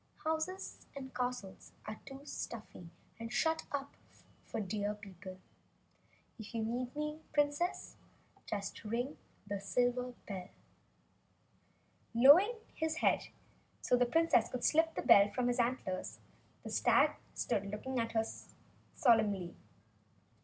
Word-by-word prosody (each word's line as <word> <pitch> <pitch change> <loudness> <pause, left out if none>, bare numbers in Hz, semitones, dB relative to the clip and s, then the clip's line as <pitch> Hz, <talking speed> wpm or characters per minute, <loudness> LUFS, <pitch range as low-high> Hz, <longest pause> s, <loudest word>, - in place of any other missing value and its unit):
"Houses 320 +4 -3
and 265 -1 -7
castles 245 -6 -4
are 215 0 -6
too 270 0 -8
stuffy 215 - -7 0.3
and 230 0 -6
shut 320 +6 +1
in 280 -1 -1 0.6
for - - -5
Deer 205 +1 -2
people. 190 -2 -10 1.0
If 220 +2 -8
you 225 - 0
need 245 +3 -3
me, 300 +1 -3
Princess, 295 +4 0 0.5
just 200 +1 -4
ring 240 +6 -2 0.3
the 200 -1 -3
silver 245 +4 0
bell." 190 -3 -5 1.7
Lowering 310 - +8 0.2
his 320 0 -1
head - - +2 0.6
so - - +4
the 245 0 +3
Princess 325 -5 +3
could 250 -1 -4
slip 325 +1 +3
the - - -2
bell 200 0 +7
from 245 +3 -1
his 245 - 0
antlers, 235 -6 -1 0.5
the - - -6
stag - - +4 0.2
stood 200 0 -1
looking 250 +5 -3
at 230 0 -1
her 225 -1 +2 0.7
solemnly. 210 -8 +3
245 Hz, 125 wpm, -35 LUFS, 210-285 Hz, 1.7 s, Lowering